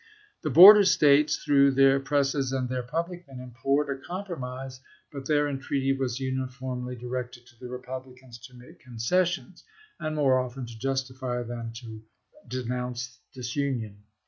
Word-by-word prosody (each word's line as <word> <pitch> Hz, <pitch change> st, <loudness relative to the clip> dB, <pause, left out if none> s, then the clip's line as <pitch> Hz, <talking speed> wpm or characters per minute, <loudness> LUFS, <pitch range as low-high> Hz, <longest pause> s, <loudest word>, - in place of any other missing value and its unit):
The -, -, -2 dB
border 205 Hz, +5 st, +10 dB
States, 150 Hz, -4 st, +4 dB
through 140 Hz, -1 st, +4 dB
their 135 Hz, 0 st, +5 dB
presses 135 Hz, -1 st, 0 dB
and 130 Hz, -1 st, -1 dB
their 125 Hz, 0 st, -2 dB
public 170 Hz, +7 st, -4 dB
men, 135 Hz, -2 st, -10 dB
implored 135 Hz, +4 st, -1 dB
a 135 Hz, -1 st, -4 dB
compromise, 135 Hz, -8 st, -6 dB, 0.3 s
but 140 Hz, -2 st, -7 dB
their 150 Hz, -1 st, +2 dB
en 140 Hz, -2 st, -3 dB
treaty 135 Hz, 0 st, 0 dB
was 130 Hz, -2 st, -3 dB
uniformly 130 Hz, -1 st, -4 dB
directed 125 Hz, 0 st, -6 dB
to 120 Hz, -1 st, -22 dB
the 125 Hz, -, -8 dB
Republicans 125 Hz, -1 st, -9 dB
to 125 Hz, -, -19 dB
make 125 Hz, -, -16 dB
concessions, 170 Hz, +10 st, -2 dB, 0.4 s
and 155 Hz, 0 st, -3 dB
more 135 Hz, -4 st, +3 dB
often 125 Hz, 0 st, -5 dB
to 115 Hz, -1 st, -11 dB
justify 130 Hz, -1 st, -3 dB
than 115 Hz, -1 st, -6 dB
to 115 Hz, -2 st, -9 dB, 0.5 s
denounce 125 Hz, 0 st, -4 dB
disunion. 120 Hz, -5 st, -4 dB
130 Hz, 145 wpm, -27 LUFS, 125-140 Hz, 0.5 s, border